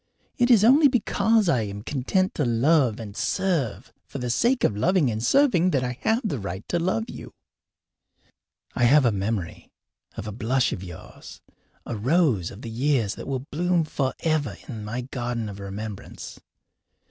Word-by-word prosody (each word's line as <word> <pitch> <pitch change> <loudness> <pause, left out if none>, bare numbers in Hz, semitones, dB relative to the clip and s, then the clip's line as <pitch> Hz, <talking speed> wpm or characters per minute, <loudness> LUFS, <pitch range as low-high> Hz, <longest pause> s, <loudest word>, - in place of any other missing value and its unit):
It 245 0 +3
is 225 -5 +6
only 280 +6 +7
because 225 -4 +2
I 130 -9 +2
am 100 -1 -6
content 150 - 0
to 150 - -1
love 125 0 +2
and 105 -3 -8
serve 140 - -1
for - - -7
the 125 -2 -2
sake 240 - +2
of 105 - +2
loving 160 - +2
and 110 +1 -3
serving 185 - +3
that 135 -7 +1
I 125 0 -4
have 225 +3 +1
the 140 - -3
right 95 0 -6
to 175 - +1
love 140 -11 -1
you. - - -10 1.4
I 120 - +2
have 140 +3 +5
a 120 - +4
memory 100 -3 -3 0.5
of - - -5
a 105 - -5
blush 125 +4 0
of 95 - -6
yours 85 -3 -11 0.5
a 120 - -4
rose 125 - +1
of 100 - -12
the 115 - -6
years 120 -3 +1
that - - -9
will 135 -1 -3
bloom 175 +2 +1
forever 145 - -1
in 110 -5 -6
my 115 +4 -4
garden 120 -3 -4
of 100 -1 -8
remembrance. 100 +1 -7
125 Hz, 170 wpm, -25 LUFS, 110-170 Hz, 1.4 s, only